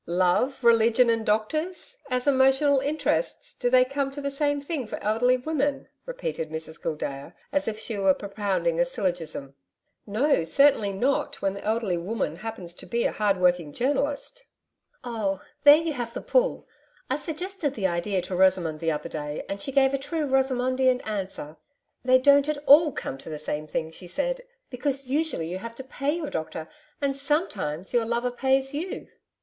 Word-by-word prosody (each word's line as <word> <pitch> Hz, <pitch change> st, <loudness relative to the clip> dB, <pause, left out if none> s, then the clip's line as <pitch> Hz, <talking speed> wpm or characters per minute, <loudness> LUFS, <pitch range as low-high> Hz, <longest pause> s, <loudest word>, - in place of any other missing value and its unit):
'Love, 185 Hz, +10 st, +1 dB
religion 235 Hz, +1 st, +5 dB
and 225 Hz, -1 st, 0 dB
doctors! 315 Hz, -, -1 dB
As 250 Hz, -1 st, 0 dB
emotional 270 Hz, +1 st, +4 dB
interests, 310 Hz, -, -1 dB
do 245 Hz, -, 0 dB
they 255 Hz, 0 st, +6 dB
come 275 Hz, +1 st, -2 dB
to 275 Hz, +1 st, -8 dB
the 280 Hz, 0 st, -2 dB
same 290 Hz, +1 st, 0 dB
thing 280 Hz, -4 st, -4 dB
for -, -, -5 dB
elderly 245 Hz, +4 st, +3 dB
women?' 285 Hz, +1 st, -1 dB, 0.2 s
repeated -, -, -4 dB
Mrs 160 Hz, +1 st, -6 dB
Gildea, 150 Hz, 0 st, -4 dB, 0.2 s
as 290 Hz, -, 0 dB
if 215 Hz, -1 st, -2 dB
she 220 Hz, -1 st, -5 dB
were 190 Hz, -1 st, +4 dB
propounding 195 Hz, -5 st, -1 dB
a -, -, +6 dB
syllogism. 170 Hz, -7 st, -3 dB, 0.5 s
'No, 235 Hz, -, +2 dB
certainly 220 Hz, -, +4 dB
not, 250 Hz, +8 st, 0 dB
when 195 Hz, -, +1 dB
the 200 Hz, -, -8 dB
elderly 215 Hz, -5 st, 0 dB
woman 180 Hz, -3 st, -3 dB
happens 190 Hz, -4 st, -7 dB
to -, -, -11 dB
be 235 Hz, 0 st, 0 dB
a -, -, +2 dB
hard 205 Hz, -2 st, +1 dB
working 175 Hz, -4 st, +2 dB
journalist.' 285 Hz, -, -1 dB, 0.6 s
'Oh, 215 Hz, -6 st, -2 dB, 0.3 s
there 290 Hz, 0 st, +11 dB
you 325 Hz, -1 st, -2 dB
have 240 Hz, -3 st, -5 dB
the -, -, -3 dB
pull -, -, +1 dB, 0.4 s
I 260 Hz, -, 0 dB
suggested 320 Hz, 0 st, -3 dB
the 200 Hz, -, -2 dB
idea 180 Hz, +1 st, 0 dB
to 185 Hz, -, -4 dB
Rosamond 180 Hz, -4 st, +3 dB
the 165 Hz, -, 0 dB
other 150 Hz, +1 st, -3 dB
day 150 Hz, -2 st, -5 dB
and 200 Hz, 0 st, -5 dB
she 275 Hz, -, -2 dB
gave 270 Hz, 0 st, +4 dB
a 275 Hz, -, 0 dB
true 315 Hz, +2 st, -2 dB
Rosamondian 260 Hz, -1 st, +2 dB
answer. 190 Hz, -7 st, -5 dB, 0.5 s
"They 255 Hz, 0 st, +6 dB
don't 280 Hz, +2 st, +5 dB
come 305 Hz, -, 0 dB
at 285 Hz, -, -11 dB
all 300 Hz, +2 st, +7 dB
to 135 Hz, -, -6 dB
the 155 Hz, -, -4 dB
same 150 Hz, 0 st, -3 dB
thing," 160 Hz, +1 st, -3 dB
she 180 Hz, +2 st, -10 dB
said, -, -, -1 dB, 0.3 s
"because 270 Hz, +1 st, -2 dB
usually 295 Hz, -, 0 dB
you 180 Hz, +2 st, -4 dB
have 230 Hz, +3 st, -8 dB
to 265 Hz, -, -8 dB
pay 275 Hz, +3 st, -2 dB
your 330 Hz, -4 st, -4 dB
doctor 160 Hz, 0 st, -4 dB, 0.3 s
and 275 Hz, -1 st, 0 dB
SOMETIMES 260 Hz, -, -1 dB
your 235 Hz, -2 st, +2 dB
lover 235 Hz, +2 st, -1 dB
pays 265 Hz, +2 st, +1 dB
you." 330 Hz, +6 st, -4 dB
245 Hz, 180 wpm, -26 LUFS, 185-280 Hz, 0.6 s, there